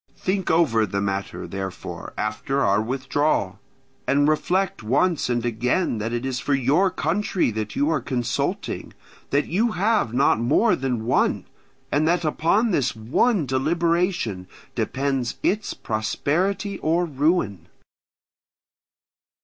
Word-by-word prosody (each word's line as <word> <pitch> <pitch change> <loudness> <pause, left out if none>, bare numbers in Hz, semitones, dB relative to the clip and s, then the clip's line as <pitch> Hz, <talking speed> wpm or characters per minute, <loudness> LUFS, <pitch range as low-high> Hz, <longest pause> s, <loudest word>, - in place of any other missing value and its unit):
Think 190 0 -1
over 125 -10 +3
the 100 +1 -2
matter, 100 0 -3
therefore, 95 -1 -6
after 110 +6 -1
our 100 -1 +3
withdrawal, 130 -5 0 0.5
and 140 +2 +3
reflect 175 +4 +1
once 140 +10 +1
and 120 -1 0
again 120 +4 0
that 110 +2 -2
it 120 +2 -2
is 130 -1 -2
for 145 - +1
your 145 +9 +3
country 185 - 0
that 110 -1 -4
you 145 - +2
are 155 -4 0
consulting, 120 -2 -2 0.4
that 145 +1 +2
you 215 +6 +1
have 210 - +1
not 125 -2 +3
more 145 - +3
than 125 -4 -2
one, 125 - +1 0.5
and 150 +2 +2
that 175 0 +1
upon 195 +9 +2
this 135 -9 +1
one 150 - +1
deliberation 165 - 0 0.3
depends 135 -2 -1
its 210 +1 0
prosperity 180 - -1
or 170 +3 +1
ruin. 145 - 0
140 Hz, 125 wpm, -23 LUFS, 115-175 Hz, 0.5 s, over